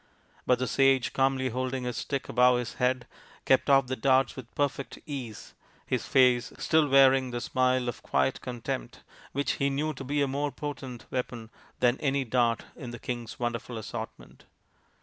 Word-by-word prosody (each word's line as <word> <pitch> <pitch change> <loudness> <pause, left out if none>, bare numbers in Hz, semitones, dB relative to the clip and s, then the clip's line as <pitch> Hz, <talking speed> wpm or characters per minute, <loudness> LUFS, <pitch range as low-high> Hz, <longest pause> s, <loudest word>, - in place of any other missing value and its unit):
But 125 - +4
the 130 - -1
sage, 135 -1 +3
calmly 135 -1 +1
holding 130 +1 -2
his 125 -1 -3
stick 140 -2 -3
above 125 +1 +4
his 120 -2 -4
head, 125 0 +1 0.4
kept 130 +2 +3
off 135 -1 +6
the 130 +1 -3
darts 130 +2 +2
with 125 -3 -9
perfect 140 -2 -2
ease, 130 -8 -7 0.3
his - - -2
face 125 -2 +4
still 160 -1 +3
wearing 135 -1 +5
the 120 0 -3
smile 130 0 +1
of 120 - -4
quiet 65 -1 0
contempt, 120 - -5 0.3
which 140 -1 0
he 140 - +1
knew 145 +3 -1
io 135 -3 -6
be 145 +2 0
a - - +1
more 140 +2 -1
potent 135 -5 -6
weapon 120 -3 -4 0.3
than 125 +1 +3
any 140 -1 +1
dart 120 -2 +1
in 130 -6 -8
the 120 - -7
king's 120 -1 -5
wonderful 120 0 -3
assortment. 110 +1 -8
130 Hz, 170 wpm, -28 LUFS, 120-135 Hz, 0.4 s, off